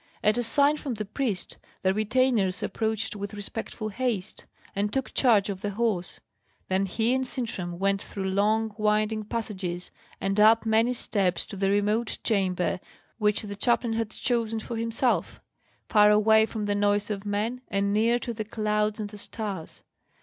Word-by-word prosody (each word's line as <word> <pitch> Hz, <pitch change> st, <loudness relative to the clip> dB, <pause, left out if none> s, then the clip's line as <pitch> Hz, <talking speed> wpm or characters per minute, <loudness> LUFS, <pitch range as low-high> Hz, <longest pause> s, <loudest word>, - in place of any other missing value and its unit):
At 210 Hz, +1 st, +4 dB
a 245 Hz, -, +1 dB
sign 280 Hz, +6 st, +3 dB
from 275 Hz, -5 st, -4 dB
the 215 Hz, 0 st, -4 dB
priest, 215 Hz, -3 st, -3 dB, 0.3 s
the 190 Hz, 0 st, +3 dB
retainers 215 Hz, -3 st, +2 dB
approached 220 Hz, +1 st, -1 dB
with 205 Hz, +1 st, -5 dB
respectful 215 Hz, +1 st, -4 dB
haste, 230 Hz, -4 st, -3 dB, 0.3 s
and 205 Hz, +1 st, 0 dB
took 265 Hz, +2 st, -2 dB
charge 220 Hz, -6 st, +4 dB
of 195 Hz, -2 st, -4 dB
the 205 Hz, -, -2 dB
horse; 215 Hz, -7 st, -1 dB, 0.5 s
then 190 Hz, +1 st, +1 dB
he 225 Hz, +5 st, +1 dB
and 260 Hz, 0 st, +1 dB
Sintram 220 Hz, -9 st, -2 dB
went 195 Hz, +1 st, +1 dB
through 195 Hz, -1 st, -5 dB
long 215 Hz, +3 st, +1 dB
winding 215 Hz, +1 st, +1 dB
passages 190 Hz, -6 st, -4 dB, 0.3 s
and 195 Hz, +1 st, 0 dB
up 225 Hz, +2 st, +6 dB
many 225 Hz, +3 st, +3 dB
steps 190 Hz, -6 st, 0 dB
to -, -, -8 dB
the 195 Hz, 0 st, +1 dB
remote 210 Hz, +3 st, +1 dB
chamber 185 Hz, -4 st, +1 dB, 0.4 s
which 210 Hz, -1 st, +2 dB
the 205 Hz, -1 st, -6 dB
chaplain 235 Hz, +2 st, +1 dB
had 225 Hz, -1 st, -1 dB
chosen 225 Hz, -1 st, -1 dB
for 230 Hz, +2 st, -6 dB
himself; 230 Hz, +2 st, 0 dB, 0.5 s
far 210 Hz, -1 st, +6 dB
away 220 Hz, +1 st, +5 dB
from 215 Hz, -2 st, -4 dB
the 205 Hz, -, 0 dB
noise 205 Hz, +1 st, +1 dB
of 200 Hz, -1 st, -3 dB
men, 210 Hz, +5 st, -2 dB
and 200 Hz, 0 st, 0 dB
near 230 Hz, +3 st, +3 dB
to 240 Hz, -1 st, -4 dB
the 215 Hz, -1 st, -4 dB
clouds 210 Hz, 0 st, -1 dB
and 205 Hz, -1 st, -4 dB
the 210 Hz, -, -9 dB
stars. 200 Hz, -7 st, -6 dB
215 Hz, 170 wpm, -27 LUFS, 200-230 Hz, 0.5 s, up